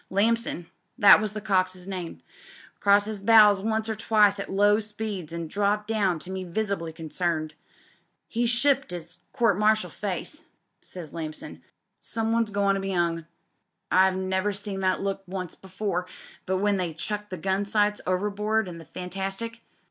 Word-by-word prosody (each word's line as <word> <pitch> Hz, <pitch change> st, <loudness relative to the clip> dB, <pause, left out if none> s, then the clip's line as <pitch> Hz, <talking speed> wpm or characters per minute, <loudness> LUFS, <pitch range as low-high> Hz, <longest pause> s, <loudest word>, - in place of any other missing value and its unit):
Lamson 215 Hz, -2 st, +1 dB, 0.2 s
— 190 Hz, +6 st, -30 dB
^that 205 Hz, -1 st, +8 dB
was 215 Hz, -1 st, -2 dB
the 215 Hz, -, -4 dB
cox*s 185 Hz, -3 st, 0 dB
name 185 Hz, -3 st, -6 dB, 0.3 s
— -, -, -21 dB
crossed 205 Hz, +1 st, +4 dB
'is 215 Hz, -2 st, -4 dB
bows 210 Hz, -1 st, +7 dB
once 220 Hz, +1 st, -1 dB
or 220 Hz, -, -2 dB
twice 210 Hz, -2 st, +3 dB
at 200 Hz, -, -5 dB
low 205 Hz, +2 st, +4 dB
speeds 210 Hz, -6 st, -5 dB
an' 170 Hz, 0 st, -4 dB
dropped 205 Hz, +4 st, 0 dB
down 200 Hz, -6 st, +1 dB
to 180 Hz, +4 st, -9 dB
me 190 Hz, 0 st, -4 dB
visibly 185 Hz, -2 st, -2 dB
concerned. 160 Hz, -1 st, -2 dB, 0.7 s
'He's 235 Hz, 0 st, 0 dB
shipped 265 Hz, 0 st, +2 dB
'is 175 Hz, 0 st, -7 dB
court 230 Hz, -7 st, +2 dB
martial 215 Hz, -4 st, +2 dB
face,' 210 Hz, -, -5 dB, 0.4 s
says 170 Hz, -5 st, -9 dB
Lamson. 155 Hz, -2 st, -6 dB, 0.4 s
'Some 225 Hz, 0 st, -2 dB
one's 230 Hz, -1 st, +2 dB
goin' 200 Hz, -1 st, +2 dB
to 195 Hz, -, -2 dB
be 195 Hz, -1 st, -2 dB
'ung. 165 Hz, -2 st, 0 dB, 0.6 s
I've 190 Hz, 0 st, +5 dB
never 190 Hz, +2 st, 0 dB
seen 200 Hz, 0 st, -5 dB
that 185 Hz, -1 st, +1 dB
look 195 Hz, 0 st, -1 dB
but -, -, -14 dB
once 185 Hz, -3 st, -4 dB
before 190 Hz, -1 st, -3 dB, 0.4 s
when 195 Hz, +2 st, +1 dB
they 175 Hz, -4 st, -2 dB
chucked 210 Hz, +5 st, -4 dB
the 185 Hz, -, -5 dB
gun 190 Hz, +4 st, 0 dB
sights 210 Hz, 0 st, +1 dB
over 185 Hz, +3 st, 0 dB
board 215 Hz, +1 st, 0 dB
in 170 Hz, -2 st, -8 dB
tho 165 Hz, -, -11 dB
Fantastic.' 195 Hz, +5 st, -5 dB
195 Hz, 170 wpm, -26 LUFS, 180-215 Hz, 0.7 s, ^that